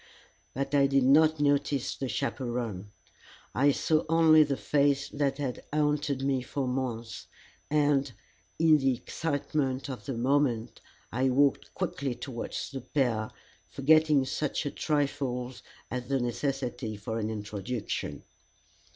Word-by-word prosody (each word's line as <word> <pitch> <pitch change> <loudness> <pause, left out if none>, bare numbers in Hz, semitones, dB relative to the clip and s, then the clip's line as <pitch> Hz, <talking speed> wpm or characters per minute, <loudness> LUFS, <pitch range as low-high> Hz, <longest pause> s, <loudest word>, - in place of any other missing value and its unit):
But 135 +1 -3
I 140 -1 +5
did 135 -1 +3
not 155 +4 +5
notice 145 -2 +1
the 135 - -4
chaperon. 120 -8 -3 0.6
I 140 +3 +4
saw 155 +3 +1
only 160 -1 +6
the 140 -3 +2
face 140 -1 +2
that 140 -2 -1
had 135 -4 -4
haunted 150 -2 0
me 135 -2 +1
for 135 +1 -3
months, 125 -3 -4 0.4
and 145 -2 +2 0.5
in 160 -2 +5
the 135 -2 +2
excitement 140 -2 -2
of 130 - -7
the 135 -4 -3
moment 125 -2 +1 0.3
I 130 +3 +1
walked 140 +2 +2
quickly 135 -3 -2
towards 120 +1 -5
the 135 -2 -5
pair, 120 -4 0 0.4
forgetting 150 0 +4
such 145 +3 -2
a 145 - -2
trifle 135 -4 -1 0.4
as 125 -1 -4
the 135 0 +1
necessity 120 -2 -2
for 110 +2 -4
an 110 0 -2
introduction. 105 +1 -4
135 Hz, 130 wpm, -29 LUFS, 125-145 Hz, 0.6 s, only